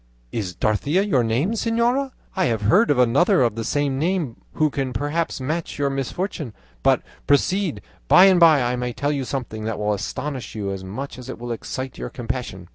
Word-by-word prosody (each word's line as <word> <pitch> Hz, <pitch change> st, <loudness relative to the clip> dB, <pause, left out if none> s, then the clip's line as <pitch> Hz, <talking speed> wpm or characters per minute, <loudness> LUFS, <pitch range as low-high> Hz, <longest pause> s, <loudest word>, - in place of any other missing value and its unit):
is 95 Hz, -6 st, -3 dB
Dorothea 140 Hz, -, +1 dB
your 140 Hz, -12 st, +2 dB
name, 120 Hz, -, +1 dB
señora? 235 Hz, +4 st, +1 dB, 0.3 s
I 190 Hz, -2 st, +2 dB
have 115 Hz, -6 st, 0 dB
heard 190 Hz, -, +4 dB
of 145 Hz, -, +3 dB
another 125 Hz, +4 st, +4 dB
of 115 Hz, -3 st, +2 dB
the 115 Hz, +1 st, -4 dB
same 140 Hz, +2 st, 0 dB
name 165 Hz, -6 st, -1 dB, 0.2 s
who 155 Hz, -2 st, +2 dB
can 135 Hz, -2 st, -2 dB
perhaps 145 Hz, +7 st, -1 dB
match 155 Hz, +6 st, -3 dB
your 140 Hz, -1 st, 0 dB
misfortunes. 135 Hz, -, -3 dB, 0.3 s
But -, -, +3 dB, 0.2 s
proceed; 180 Hz, +4 st, +1 dB, 0.2 s
by 185 Hz, -, +8 dB
and 190 Hz, -2 st, +6 dB
by 160 Hz, -6 st, +6 dB
I 120 Hz, +1 st, 0 dB
may 125 Hz, 0 st, -3 dB
tell 145 Hz, +3 st, -1 dB
you 140 Hz, -3 st, -2 dB
something 120 Hz, -5 st, -4 dB
that 110 Hz, -1 st, -2 dB
will 105 Hz, 0 st, 0 dB
astonish 130 Hz, +4 st, -4 dB
you 100 Hz, -2 st, -3 dB
as 95 Hz, -1 st, -5 dB
much 125 Hz, +8 st, -6 dB
as 125 Hz, 0 st, -9 dB
it -, -, -5 dB
will 120 Hz, 0 st, -6 dB
excite 130 Hz, +2 st, -5 dB
your -, -, -4 dB
compassion." 115 Hz, -7 st, -5 dB
135 Hz, 200 wpm, -22 LUFS, 115-165 Hz, 0.3 s, by